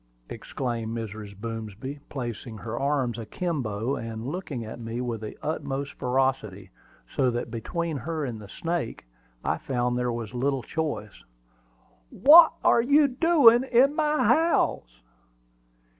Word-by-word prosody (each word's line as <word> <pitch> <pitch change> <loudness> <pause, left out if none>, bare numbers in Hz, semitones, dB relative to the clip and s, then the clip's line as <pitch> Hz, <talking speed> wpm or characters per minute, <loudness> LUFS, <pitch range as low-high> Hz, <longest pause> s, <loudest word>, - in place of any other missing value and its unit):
exclaimed 115 -3 -4
Mrs. 105 -2 -7
Boomsby, 115 +4 -6
placing 120 -3 -5
her 115 +2 -5
arms 135 -4 0
akimbo, 125 - -2
and 115 -2 -6
looking 140 -6 -4
at 110 +2 -8
me 115 +1 -5
with 120 -3 -3
the 110 - -7
utmost 140 -2 -3
ferocity, 125 -8 -1 0.4
so 130 -2 +3
that 120 0 -3
between 165 +7 -3
her 155 +1 -3
and 115 -4 -5
the 100 - -11
snake 165 - -3 0.4
I - - -1
found 125 -1 -1
there 125 0 0
was 115 -1 -5
little 130 +1 -1
choice. 140 -11 -4 0.9
"What 320 +4 +8
are 235 - +5
you 285 +5 +5
a - - +4
doin' 255 -4 +5
in 265 +2 +4
my 305 -1 +1
house?" 180 - +1
125 Hz, 135 wpm, -26 LUFS, 115-165 Hz, 0.9 s, What